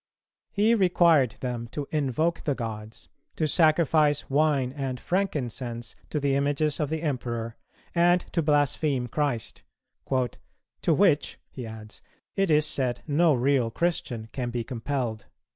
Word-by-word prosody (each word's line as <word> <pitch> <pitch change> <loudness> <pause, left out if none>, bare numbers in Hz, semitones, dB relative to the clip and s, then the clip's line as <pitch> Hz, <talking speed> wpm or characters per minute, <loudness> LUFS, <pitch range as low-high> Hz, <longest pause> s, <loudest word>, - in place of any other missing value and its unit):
He 215 +3 +3
required 170 - +4
them 120 -2 -3
to 145 -2 -4
invoke 155 +3 0
the 145 -4 0
gods, 110 -2 -6 0.3
to 155 - 0
sacrifice 155 -2 +3
wine 140 -3 +2
and 135 -3 -4
frankincense 125 - -2
to 150 - -1
the 140 -1 +1
images 145 +2 +1
of 150 -3 0
the 160 +1 -3
Emperor, 120 -6 -3 0.4
and 175 +1 +4
to 170 - +2
blaspheme 145 -3 +1
Christ; 130 -3 -2 0.5
"to 130 +5 -3
which," 170 -6 +2
he 125 -3 -7
adds, 110 -1 -9 0.3
"it 195 -2 +1
is 150 -1 +4
said 130 -5 0
no 155 +1 +3
real 130 -1 +2
Christian 120 -6 -2
can 125 -2 -3
be 120 -1 -3
compelled." 120 -2 -3
140 Hz, 135 wpm, -26 LUFS, 120-155 Hz, 0.5 s, required